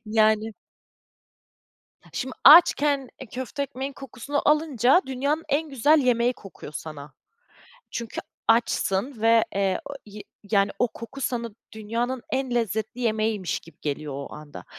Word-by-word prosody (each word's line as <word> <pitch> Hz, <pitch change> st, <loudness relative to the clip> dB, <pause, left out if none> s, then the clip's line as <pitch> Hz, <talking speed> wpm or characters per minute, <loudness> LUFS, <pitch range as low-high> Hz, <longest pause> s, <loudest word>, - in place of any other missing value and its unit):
Yani. 220 Hz, 0 st, +2 dB, 1.6 s
Şimdi 260 Hz, 0 st, -4 dB
açken, 290 Hz, -3 st, +7 dB
eee, 265 Hz, -, -7 dB
köfte 260 Hz, +3 st, -4 dB
ekmeğin 270 Hz, +1 st, -5 dB
kokusunu 270 Hz, +1 st, -4 dB
alınca 300 Hz, -, +4 dB
dünyanın 280 Hz, +5 st, -1 dB
en 305 Hz, +2 st, 0 dB
güzel 290 Hz, +5 st, +4 dB
yemeği 245 Hz, -2 st, +2 dB
kokuyor 195 Hz, -, -12 dB
sana. 150 Hz, -2 st, -8 dB, 0.8 s
Çünkü 235 Hz, -1 st, -5 dB, 0.3 s
açsın 225 Hz, +1 st, +1 dB
ve, 230 Hz, 0 st, +5 dB
eee, 195 Hz, -1 st, +1 dB
o 280 Hz, -, -8 dB
yi 210 Hz, 0 st, -10 dB, 0.3 s
yani 200 Hz, -2 st, +3 dB
o 245 Hz, -, +2 dB
koku 230 Hz, +5 st, -10 dB
sana 235 Hz, -3 st, -2 dB, 0.2 s
dünyanın 230 Hz, +4 st, -3 dB
en 265 Hz, -2 st, -1 dB
lezzetli 220 Hz, 0 st, -2 dB
yemeğiymiş 215 Hz, -4 st, 0 dB
gibi 165 Hz, -, -18 dB
geliyor 145 Hz, 0 st, -4 dB
o 140 Hz, 0 st, -7 dB
anda. 150 Hz, -1 st, -10 dB
235 Hz, 130 wpm, -25 LUFS, 215-270 Hz, 1.6 s, açken